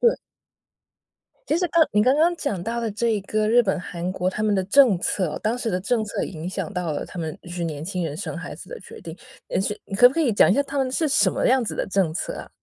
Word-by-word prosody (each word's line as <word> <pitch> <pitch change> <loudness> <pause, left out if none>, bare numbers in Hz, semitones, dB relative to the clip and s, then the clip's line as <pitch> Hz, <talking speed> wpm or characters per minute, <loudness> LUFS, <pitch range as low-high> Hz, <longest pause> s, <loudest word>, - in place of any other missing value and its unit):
对。 475 -1 +4 1.3
其 310 - +2
实 360 - 0
刚 325 0 +4
你 210 - +4
刚 255 +5 +4
刚 335 +3 +3
讲 215 - -3
到 230 +5 -3
了 230 -2 -2
这 220 0 0
个 215 +2 -1
日 240 +2 +5
本 190 -3 -1
韩 180 0 -4
国 185 -1 -1
他 215 +3 -3
们 215 - +2
的 190 -2 +1
政 220 -3 +5
策， 180 -3 -1
当 220 +3 0
时 235 -2 -2
的 180 - -1
政 220 +3 0
策 205 - -3
影 170 0 -6
响 195 - -4
到 180 -4 -2
了 145 - -3
他 180 - -7
们 160 -1 -4
就 - - -14
是 175 0 -5
年 155 -2 -4
轻 180 -1 -3
人 150 -2 -4
生 200 - -5
孩 - - -7
子 - - -11
的 - - -7
决 - - -12
定， - - -9 0.3
也 - - 0
许 210 +2 -2
你 195 - -7
可 245 +5 +8
不 260 - -8
可 330 - +1
以 255 -8 +2
讲 200 - +5
一 195 - +4
下 - - +3
他 280 +1 -7
们 265 -2 +1
是 315 +4 0
什 205 -8 +3
么 - - 0
样 260 0 +4
子 - - -5
的 - - -1
政 190 -5 +1
策 165 - -4
啊？ - - -8
210 Hz, 305 characters per minute, -23 LUFS, 180-250 Hz, 1.3 s, 可